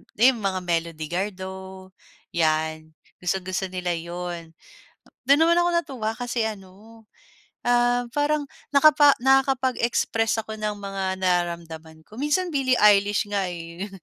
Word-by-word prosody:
di 245 +5 +6
mga 195 -5 -2
Melody 165 -2 -2
Gardo 190 0 -5 0.4
yan 160 -1 0 0.3
gustong 180 +1 -1
gusto 185 +1 -1
nila 180 -1 -3
yun. 170 -1 -6 0.7
Dun 280 +3 +5
naman 335 +1 +5
ako 350 0 +2
natuwa 260 -10 -1
kasi 245 -2 -2
ano, 210 +2 -11 0.6
um, 245 0 +3
parang 290 0 0 0.3
nakapa 290 0 +7
nakakapag-express 255 -4 +1
ako 220 0 -7
ng 210 0 -1
mga 195 -1 -3
nararamdaman 170 -3 -2
ko 215 - -15
minsan 345 +5 0
Billie 260 -3 +2
Eilish 205 0 +4
nga, 200 -2 0
eh. 170 +4 -7
200 Hz, 125 wpm, -24 LUFS, 175-245 Hz, 0.7 s, nakapa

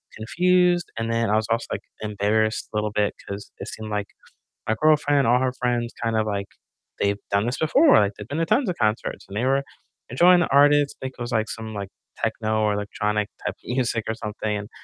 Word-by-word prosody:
confused, 180 +8 +2
and 115 0 -2
then 115 -1 +1
I 105 - +3
was 110 0 +1
also, 115 - +1
like, - - -3 0.2
embarrassed 105 +1 0
a - - -1
little 105 0 -1
bit 105 -1 0
'cause 100 0 -7
it - - -6
seemed 110 0 -6
like 105 -1 -2 0.6
my 110 - +1
girlfriend, 145 -3 +3
all 125 +2 +4
her 130 -1 0
friends 120 -2 -1
kind 115 -1 0
of, 110 - +1
like, 100 -1 -2 0.5
they've 100 0 +1
done 100 +2 +2
this 125 - -2
before, 275 - +5
like, 100 0 +1
they've 105 - -9
been 145 - -4
to 165 - +1
tons 250 - +2
of 175 - -3
concerts, 110 0 -1
and 100 - -9
they 120 - 0
were 135 +1 +2 0.5
enjoying 175 +8 +5
the - - +1
artist, 145 +1 +4
I - - -5
think 130 - -10
it - - -7
was, 120 +1 -4
like, 110 -2 0
some, 110 -1 -6
like, 100 -1 -5 0.3
techno 110 -1 -1
or 105 -1 +2
electronic 105 +1 -1 0.2
type - - -2
of - - -36
music 120 -2 -1
or 110 - 0
something, 105 -1 -3
and 105 +2 -7
115 Hz, 225 wpm, -24 LUFS, 105-135 Hz, 0.6 s, before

